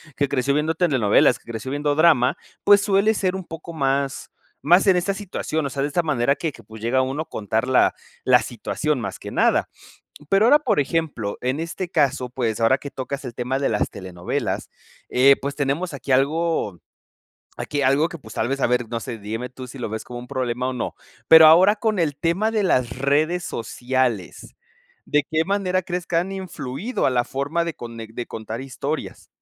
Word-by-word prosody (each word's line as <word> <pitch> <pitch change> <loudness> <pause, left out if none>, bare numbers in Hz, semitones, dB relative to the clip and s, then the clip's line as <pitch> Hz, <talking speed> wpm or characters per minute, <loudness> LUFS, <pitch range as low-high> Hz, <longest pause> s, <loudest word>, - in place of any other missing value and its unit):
que 140 -1 0
creció 140 +2 +1
viendo 155 +2 0
telenovelas, 130 - +3
que - - -30
creció 115 +3 -5
viendo 145 0 0
drama, 155 -3 +4 0.3
pues, 205 0 +7
suele 205 +1 +2
ser 190 -2 0
un 190 - -5
poco 165 0 -9
más, 140 -2 -1 0.3
más 175 +6 +4
en 190 - +6
esta 180 +3 0
situación, 180 -6 -3
o - - -2
sea, 135 +1 -3
de 145 - 0
esta 170 +3 0
manera 140 -2 +1
que 160 - -3
que, 115 - -15
pues, 110 +1 -12
llega 125 +3 +2
uno 135 +4 -2
a - - -28
contar 110 +3 -2
la 130 - +4 0.3
la 125 -2 +5
situación 145 +4 -2
más 100 -3 -5
que - - -7
nada. - - +2 0.6
Pero 195 +2 +4
ahora, 290 +5 +6
por 230 - +1
ejemplo, 145 -8 -2
en 130 +4 -1
este 170 +2 -4
caso, 140 -6 +1
pues, 115 -4 -2
ahora 115 +4 +4
que 140 - -7
tocas 135 +2 -5
el 120 -2 -7
tema 130 +2 -2
de 140 - +1
las 105 - 0
telenovelas, 90 -2 -4 0.4
eh, 135 +2 +6
pues, 140 0 -3
tenemos 145 +4 -1
aquí 135 0 -5
algo 140 - +1 0.8
aquí 145 -1 -3
algo 140 +4 +3
que, 170 - -9
pues, 110 -6 -13
tal 110 - 0
vez, 135 0 -2
a - - +3
ver, 125 -1 0
no 115 -1 -2
sé, 115 +1 -6
dígame 110 +4 -5
tú 130 0 -9
si 135 - -10
lo 125 - -4
ves 110 +1 -5
como 120 0 -7
un 125 - -10
problema 125 0 -2
o 130 - -3
no. 125 - -4 0.3
Pero 160 -1 +10
ahora 185 +6 +7
con 215 -3 -1
el 150 -4 0
tema 185 +6 0
de 215 -2 0
las 125 -10 +2
redes 155 +6 +1
sociales, 120 -3 -2 0.5
¿de 150 0 +2
qué 160 0 +1
manera 185 -2 0
crees 175 -1 -4
que 170 - -2
han 180 +3 0
influido 185 - -4
a - - +4
la 120 -1 +1
forma 145 +5 -2
de 170 - -3
cone 115 -1 -8
de 120 - -4
contar 110 +2 -6
historias? 135 -2 -5
140 Hz, 205 wpm, -22 LUFS, 125-170 Hz, 0.8 s, Pero